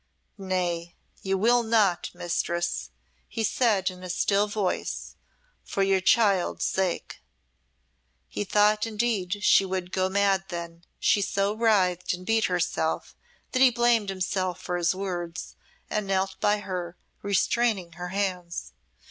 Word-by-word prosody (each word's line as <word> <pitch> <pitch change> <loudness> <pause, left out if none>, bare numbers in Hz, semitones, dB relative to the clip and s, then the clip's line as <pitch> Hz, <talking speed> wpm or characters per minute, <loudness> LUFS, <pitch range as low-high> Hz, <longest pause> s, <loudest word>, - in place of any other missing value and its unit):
"Nay, 175 -3 -2 0.3
you 195 0 0
will 240 +5 +4
not, 220 -6 +2
Mistress," 175 - -2 0.4
he 225 - -3
said, 210 -4 +2
in 180 0 -12
a 185 - -7
still 200 +3 +2
voice, 205 -3 -3 0.5
"for 195 - -1
your 195 -1 +2
child's 200 -2 +3
sake." 190 -2 -2 1.1
He 205 - -3
thought, 210 +2 +3
indeed, 210 -3 -1
she 195 - +6
would 185 -1 -3
go 185 0 +1
mad 195 -1 +2
then: 170 -1 -7
she 205 - +3
so 200 +1 0
writhed 190 -6 +2
and 180 +1 -12
beat 225 +1 +2
herself, 175 -3 -1 0.4
that 255 - 0
he 265 - +8
blamed 235 -3 +2
himself 185 -1 -2
for 180 - -3
his 175 +1 +1
words, 180 -2 -5 0.3
and 210 -2 -2
knelt 190 0 0
by 205 0 +2
her, 180 -3 -5 0.2
restraining 200 -2 +1
her 175 +2 -6
hands. 180 -2 -3
190 Hz, 135 wpm, -26 LUFS, 180-210 Hz, 1.1 s, he